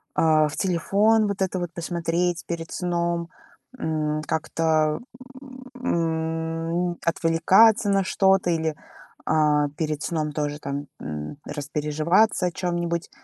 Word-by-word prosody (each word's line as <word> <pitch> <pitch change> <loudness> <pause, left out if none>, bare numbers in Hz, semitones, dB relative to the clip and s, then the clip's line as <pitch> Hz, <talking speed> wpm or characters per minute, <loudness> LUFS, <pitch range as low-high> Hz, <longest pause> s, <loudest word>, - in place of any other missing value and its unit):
э, 155 -1 +4
в 145 - -6
телефон 205 +4 +2
вот 200 -1 -3
это 190 -1 0
вот 175 -1 -4
посмотреть 170 0 -1
перед 165 -1 -5
сном, 170 -1 -1 0.5
м, 155 -6 -1
как-то, 155 -1 +1 0.8
м, 165 -1 -1
отвлекаться 190 +7 +4
на 195 -1 +3
что-то 190 -1 +2
или, 160 -2 -1 0.5
э, - - +2 0.4
перед 155 -2 -2
сном 155 -3 -2
тоже 150 -1 -2
там, 140 0 -4 0.2
м, 75 - -6
распереживаться 150 +8 +1
о - - -2
чём-нибудь. 175 -1 -2
165 Hz, 115 wpm, -24 LUFS, 155-180 Hz, 0.8 s, э